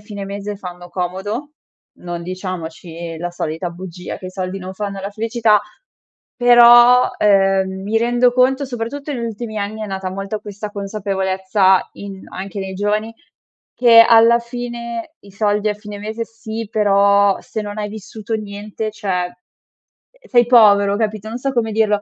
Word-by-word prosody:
fine 205 -1 -7
mese 200 +1 -5
fanno 180 -2 -9
comodo, 190 +10 -4 0.5
non 175 -1 -6
diciamoci 170 -2 -6
la 175 +1 -4
solita 170 0 -4
bugia, 180 0 -8
che 185 - -9
i 185 - -7
soldi 185 0 -4
non 185 0 -7
fanno 200 0 -5
la 200 +1 -5
felicità, 220 -1 +2 0.8
però, 240 0 +7
ehm, 195 -1 +2
mi 220 +3 0
rendo 240 +1 +2
conto, 260 +2 +2
soprattutto 275 +4 -5
negli 235 -3 -3
ultimi 220 -1 -5
anni, 215 +2 -4
è - - -4
nata 190 -1 -4
molto 195 +2 -5
questa 205 0 -7
consapevolezza 190 -2 0
in 195 -1 -9
anche 195 +2 -7
nei 190 0 -5
giovani 210 +3 -1 0.6
che 235 -2 +7
alla 230 +1 +6
fine 235 +1 -6
i 200 - -16
soldi 210 +1 0
a - - 0
fine 210 -1 -9
mese 220 +2 -4
sì, 225 -1 -7
però, 200 -1 +3
se 215 - -5
non 205 0 -7
hai 210 - -2
vissuto 220 +1 -7
niente, 210 +1 -5
cioè, 185 -4 -2
ehm, 180 - -10 0.9
sei 240 -2 +5
povero 205 -4 +5
capito, 215 -1 -2
non 235 - -4
so 270 +1 -2
come 225 -2 0
dirlo 210 -1 +1
205 Hz, 160 wpm, -19 LUFS, 190-225 Hz, 0.9 s, però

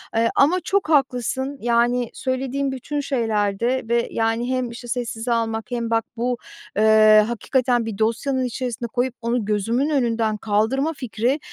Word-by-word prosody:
Eee, 230 0 +3
ama 325 +7 +4
çok 390 -4 0
haklısın. 265 -1 0
Yani, 240 0 +2
söylediğin 265 +1 -2
bütün 275 +3 -4
şeylerde 230 -2 0
ve, 235 0 +2
yani, 225 +2 0
hem, 255 -1 -1
işte, 235 - -10
sessize 235 -1 -3
almak 225 0 -2
hem 235 -1 -2
bak, 225 0 +1
bu, 245 +1 -1 0.4
eee, 215 0 +6
hakikaten 245 0 0
bir 220 -3 -5
dosyanın 235 +5 0
içerisine 245 -1 -3
koyup 245 +1 -1
onu 235 -1 -1
gözümün 225 +7 0
önünden 230 -6 +1
kaldırma 220 +9 0
fikri 250 0 -1
240 Hz, 145 wpm, -22 LUFS, 225-260 Hz, 0.4 s, eee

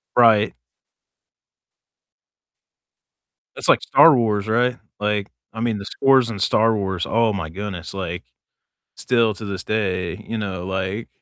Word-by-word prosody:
Right. 110 - +4 3.0
That's - - -2
like - - +5
Star 165 -4 +6
Wars, 105 -4 0
right? 120 +3 +1 0.2
Like, 105 -1 -1 0.2
I 110 - -6
mean, 115 -2 0
the 100 - -8
scores 130 +1 +3
in 105 - -6
Star 110 +3 +2
Wars, 95 -3 -2
oh 115 -1 +2
my 95 -5 -4
goodness, 95 0 -7
like, 90 -5 -5 0.7
still 115 -4 +1
to 110 - -9
this 100 -2 -5
day, 90 -5 -2
you 115 - -3
know, 95 -4 -4
like, 95 +3 -3
105 Hz, 135 wpm, -21 LUFS, 95-115 Hz, 3.0 s, Star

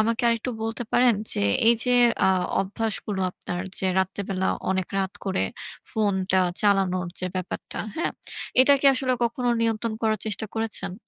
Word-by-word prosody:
আমাকে 230 +3 +1
আরেকটু 230 +1 0
বলতে 225 +2 -3
পারেন 245 -2 +5 0.2
যে, - - 0 0.3
এইযে 235 +2 +3 0.4
আ - - +5 0.3
অভ্যাসগুলো 205 0 -3
আপনার 175 0 -5 0.2
যে 190 - 0
রাত্রেবেলা 190 0 -1 0.2
অনেক 190 -1 0
রাত 190 0 -1
করে 190 -1 0 0.5
ফোনটা 190 -4 +1 0.2
চালানোর 190 -3 +2
যে 185 - -1
ব্যাপারটা, 185 -1 -5 0.2
হ্যা? 335 - 0 0.5
এটা 280 +2 +6
কি 280 - +3
আসলে 255 0 0
কখনো 245 +1 -1
নিয়ন্ত্রণ 225 0 0
করার 220 -1 +1
চেষ্টা 215 +1 -2
করেছেন? 225 -4 -2
215 Hz, 145 wpm, -25 LUFS, 190-230 Hz, 0.5 s, এটা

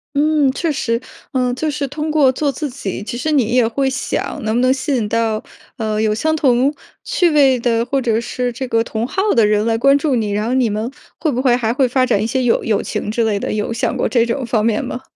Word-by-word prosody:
嗯， 300 -1 +3
确 320 +4 -1
实， 230 -5 -1 0.3
呃， 250 -2 0
就 310 +5 -2
是 290 -1 -2
通 300 +3 -4
过 300 -4 +4
做 285 +2 -1
自 290 +3 -4
己， 210 -7 -5
其 235 +3 -5
实 310 +5 -1
你 280 -6 +3
也 245 -3 +4
会 270 +4 -1
想， 265 +1 -3
能 220 +1 -1
不 240 - +2
能 255 +1 +4
吸 275 +1 -2
引 225 -4 0
到， 225 0 0 0.3
呃， 215 -2 -1
有 215 -1 +1
相 315 +8 0
同 270 -1 +2 0.3
趣 355 - +2
味 275 -4 +4
的， 230 -1 +1
或 275 +2 -1
者 230 -3 +1
是 245 +1 -3
这 255 +2 -5
个 230 -2 +1
同 225 0 -3
好 380 +10 -2
的 230 -3 +5
人 210 0 +2
来 225 -1 +1
关 275 +4 +4
注 285 -2 0
你。 215 -3 -1
然 210 +1 -1
后 245 - 0
你 250 -3 +2
们 215 +3 -2 0.3
会 310 -1 0
不 250 - -2
会 255 -2 +3
还 230 -2 0
会 260 +1 +2
发 255 +1 +1
展 205 -4 +1
一 - - -1
些 260 +3 0
友 245 -2 +2
友 215 -3 +1
情 210 - -4
之 230 +1 0
类 215 -2 +1
的， - - -3
有 210 +1 -2
想 230 - -1
过 - - 0
这 235 -2 +3
种 250 +3 -2
方 220 -2 0
面 225 -2 +1
吗？ 245 - -5
245 Hz, 275 characters per minute, -18 LUFS, 225-275 Hz, 0.3 s, 的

